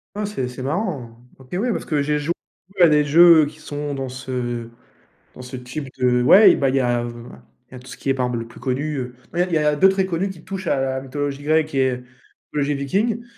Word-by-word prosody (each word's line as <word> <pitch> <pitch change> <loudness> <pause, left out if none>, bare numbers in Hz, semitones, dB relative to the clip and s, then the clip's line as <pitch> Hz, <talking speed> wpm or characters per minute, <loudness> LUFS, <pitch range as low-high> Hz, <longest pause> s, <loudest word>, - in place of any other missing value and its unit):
Ah, 210 0 -2
c'est 200 -11 -3
c'est 125 +1 -8
marrant! 135 - -4
OK, 130 -1 -17
ouais, 230 +7 0
parce - - -4
que 150 -3 0
j'ai 150 +1 0
jou 150 +3 -1 0.5
à 175 - +8
des 150 -1 +4
jeux 160 +1 +7
qui 155 +1 -11
sont 145 -1 -5
dans 135 -1 -4
ce 125 -2 -4 0.7
dans - - -10
ce 125 +1 -8
type 125 +3 -7
de 125 -1 +2
ouais, 190 - +7
bah 135 -2 +1
il 135 - 0
y - - +3
a 120 -1 +1 0.7
il - - -32
y - - -11
a - - -8
tout 125 - -15
ce - - -10
qui - - -6
est, 135 - +3
par 130 -1 0
exemple, 125 -1 -2
le 115 - -11
plus - - -14
connu, 145 +3 -2
heu 125 -2 -5 0.2
ouais, 175 - +2
il - - -6
y 160 - +3
a - - 0
il - - 0
y - - +1
a 150 0 +2
2 190 +5 +6
très 190 0 0
connus 185 +2 -2
qui 170 -4 -11
touchent 190 -1 -6
à 135 - +1
la 130 0 -1
mythologie 140 +1 -4
grecque 155 0 +1
et 130 -2 +1 0.5
mythologie 145 0 0
viking, 205 - -1
145 Hz, 260 wpm, -21 LUFS, 130-165 Hz, 0.7 s, à